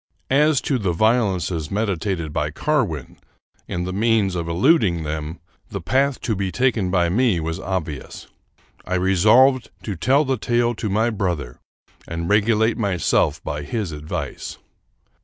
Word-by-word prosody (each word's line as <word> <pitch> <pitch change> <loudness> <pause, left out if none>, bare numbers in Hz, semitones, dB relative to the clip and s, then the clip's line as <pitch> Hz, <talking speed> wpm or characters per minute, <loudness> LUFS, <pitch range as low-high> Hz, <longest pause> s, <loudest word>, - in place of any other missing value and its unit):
As 150 +1 +4
to 135 -3 0
the 95 -5 0
violences 95 -6 +1
meditated 95 -6 -2
by 75 -1 -1
Carwin, 105 - -2 0.5
and 90 0 -2
the 95 - -4
means 110 -2 +2
of 85 -2 -3
eluding 95 - +3
them, 75 +2 -4 0.3
the 100 - -4
path 135 +9 +1
to 115 -3 -1
be 95 -1 -2
taken 120 -6 +1
by 90 -2 +2
me 105 0 +2
was 80 0 -3
obvious. 80 -7 -5 0.6
I 90 - -2
resolved 110 +8 +4
to 105 - -4
tell 135 - +2
the 135 -1 0
tale 120 +1 +1
to 105 -1 -4
my 110 +4 +1
brother 85 - -3 0.5
and 85 0 -4
regulate 110 +2 +2
myself 100 -6 +1
by 75 0 -4
his 95 +5 -3
advice. 75 0 -5
100 Hz, 145 wpm, -22 LUFS, 85-115 Hz, 0.6 s, As